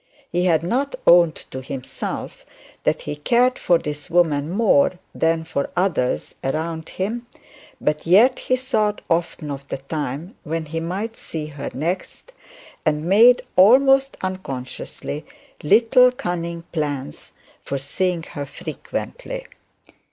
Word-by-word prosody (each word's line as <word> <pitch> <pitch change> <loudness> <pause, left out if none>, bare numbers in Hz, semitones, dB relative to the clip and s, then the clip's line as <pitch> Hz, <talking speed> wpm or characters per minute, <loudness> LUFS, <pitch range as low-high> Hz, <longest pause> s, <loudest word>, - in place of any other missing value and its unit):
He 175 +1 +1
had 165 -3 +3
not 260 - 0
owned 170 -2 +6 0.2
to 130 - -5
himself 130 0 -6 0.4
that - - +1
he - - -4
cared 245 +11 +2
for 175 - +4
this 150 -2 -6
woman 160 -4 +2
more 190 -5 +3 0.2
than 165 0 +1
for 140 -3 -2
others 180 -9 0
around 160 +3 -2
him; 230 +6 -3 0.5
but 150 +1 -1
yet 225 +9 +6
he 255 - +1
thought 220 -5 0
often 165 -3 -1
of 140 0 -7
the - - -3
time 145 - -4
when 160 +1 -3
he 165 +2 -4
might 195 +7 -3
see 155 -2 -5
her 145 -2 -6
next, 175 - -4 0.5
and 150 -1 0
made, 225 +7 +6
almost 270 +7 +6
unconsciously, 150 -4 -5 0.4
little 235 - +5
cunning 170 -6 -4
plans 145 - -4 0.3
for 140 - -3
seeing 175 +5 -1
her 145 -3 -6
frequently. - - -6
170 Hz, 130 wpm, -22 LUFS, 150-215 Hz, 0.5 s, owned